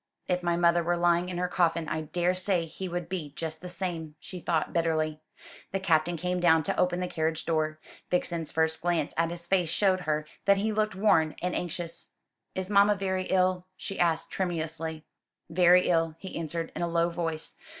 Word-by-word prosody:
"If 180 0 +1
my 170 -1 +1
mother 170 0 +4
were 175 +1 0
lying 175 +1 +2
in 180 - -4
her 180 0 0
coffin 170 -2 +1
I 160 - -2
daresay 180 +2 +1
he 185 +3 -6
would 175 -1 -3
be 170 -6 -4
just 160 -2 -4
the 180 - -7
same," 170 -4 -4
she 185 - -8
thought 165 -2 -1
bitterly. 155 -2 0 0.5
The 195 - +1
Captain 170 -2 +2
came 180 +2 -1
down 160 -2 +5
to - - -1
open 180 0 +2
the 180 - -1
carriage 160 -1 -1
door. 155 -1 0 0.3
Vixen's 170 -3 0
first 160 0 +1
glance 170 -4 0
at 165 0 +1
his 170 0 -6
face 180 -2 +2
showed 185 +2 +3
her 155 -3 -1 0.2
that 200 0 +5
he 215 +3 0
looked 215 -1 0
worn 165 -6 +3
and 180 0 -2
anxious. 170 -1 -3 0.4
"Is 185 -1 -2
mamma 200 +1 +5
very 190 -1 -1
ill?" 185 -1 +1
she 195 - -6
asked 165 -2 +1
tremulously. 165 -3 -3 0.5
"Very 180 +1 +5
ill," 165 -2 +2
he 190 +2 -8
answered, 165 0 -3
in - - -3
a 175 - +1
low 170 0 +2
voice. 165 -2 -2
170 Hz, 190 wpm, -28 LUFS, 160-180 Hz, 0.5 s, down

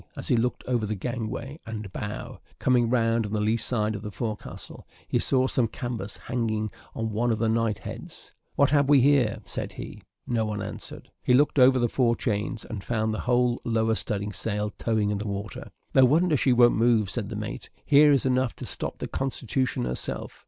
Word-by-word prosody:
As - - -5
he - - +4
looked 120 +2 0
over 120 -4 0
the 110 - -2
gangway 120 - -4
and 110 -4 -7
bow, - - -6 0.2
coming 120 -2 +2
round 115 -1 +2
on 105 - -7
the 105 - +1
lee 105 +2 +2
side 110 -2 0
of 105 - -5
the 105 - -5
forecastle, 110 0 -6 0.2
he - - +1
saw 130 -1 +3
some 125 -2 +1
canvas 115 -3 -5
hanging 110 -3 -2 0.2
on 115 -1 -2
one 115 +3 +1
of 110 - +1
the 115 0 0
night 110 -2 +1
heads - - -9 0.2
"What 140 -1 +3
have 145 -2 +3
we 145 -2 +7
here?" 130 -5 +3
said - - -5
he. - - -8 0.2
No 115 -2 0
one 105 -1 -3
answered. 100 - -7
He 125 - +2
looked 145 +1 +3
over 130 +1 +7
the 120 -1 +2
fore 120 0 +2
chains, 105 0 -2
and 105 -4 -6
found 110 -2 -1
the 110 - -3
whole 125 -1 +2
lower 110 -1 +1
studding 105 -1 -2
sail 105 -1 -2
towing 110 -2 0
in 100 - -1
the 105 - -4
water. 100 +1 -5 0.2
"No 130 - +6
wonder 160 +5 +3
she 135 -1 +2
don't 120 -1 +6
move," 110 -3 +2
said 110 -5 -3
the 115 - -5
mate; 105 0 -6 0.2
"here 145 +1 +6
is 140 -3 +3
enough 130 -1 +1
to - - -7
stop - - -2
the - - -4
Constitution 130 - -1
herself. 60 0 -3
115 Hz, 205 wpm, -26 LUFS, 110-125 Hz, 0.2 s, we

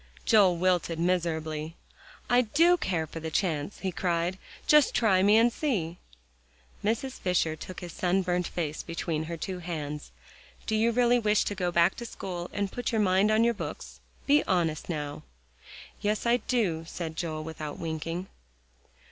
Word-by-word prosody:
Joel 195 -6 +5
wilted 175 -2 +1
miserably. 160 -3 -1 0.5
"I 245 0 +5
do 325 +10 +4
care 180 - -1
for 165 - -8
the 160 0 -4
chance," 160 0 -1
he 190 - -1
cried; 175 +1 -1 0.3
"just 300 -2 +5
try 195 -5 +4
me, 205 +3 +6
and 235 +1 +4
see." 180 - -2 0.8
Mrs. 240 +5 -1
Fisher 175 -4 +1
took 180 +3 -8
his 175 -2 -7
sunburnt 180 -1 0
face 155 -3 -3
between 165 -2 -3
her 170 +1 -5
two 185 +2 -4
hands. 150 - -5 0.5
"Do 220 - 0
you 225 +2 +3
really 245 +1 +3
wish 210 -2 +3
to - - -2
go 180 -3 -1
back 170 0 +4
to 235 - -6
school, 180 -5 -6
and 200 -1 -2
put 245 -2 -3
your 225 - +1
mind 195 0 +3
on 215 +1 +4
your 235 0 +3
books? 210 - -7 0.3
Be 290 +1 +4
honest, 170 -5 0
now." 150 -2 -4 0.8
"Yes, 210 +2 0
I 235 +1 +4
do," 205 -11 0
said 165 -2 -5
Joel, 155 -2 -3
without 155 -2 -6
winking. 165 +2 -4
180 Hz, 165 wpm, -28 LUFS, 165-215 Hz, 0.8 s, me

